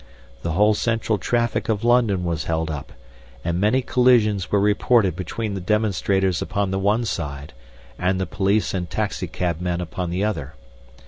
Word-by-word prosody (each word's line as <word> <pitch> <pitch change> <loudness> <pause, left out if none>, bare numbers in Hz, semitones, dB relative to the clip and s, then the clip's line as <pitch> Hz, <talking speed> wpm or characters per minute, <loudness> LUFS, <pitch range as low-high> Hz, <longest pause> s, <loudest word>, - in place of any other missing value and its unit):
The 85 - -2
whole 105 +5 +4
central 110 -1 0
traffic 120 +3 0
of 110 -1 0
London 115 -6 +3
was 85 -3 -2
held 80 0 -1
up, 75 -3 -6 0.5
and 85 +1 0
many 125 +6 +2
collisions 115 -7 +3
were 105 - +3
reported 105 -2 +3
between 100 +4 -4
the 95 - -4
demonstrators 95 -2 +1
upon 100 -2 -1
the 95 - -1
one 105 +4 +1
side 70 -7 -4 0.5
and 95 +1 +1
the 95 - 0
police 100 +3 0
and 90 -3 -3
taxi - - -2
cabmen 90 0 -2
upon 90 0 -4
the 90 +3 -1
other. 75 -9 -3
95 Hz, 165 wpm, -22 LUFS, 90-110 Hz, 0.5 s, whole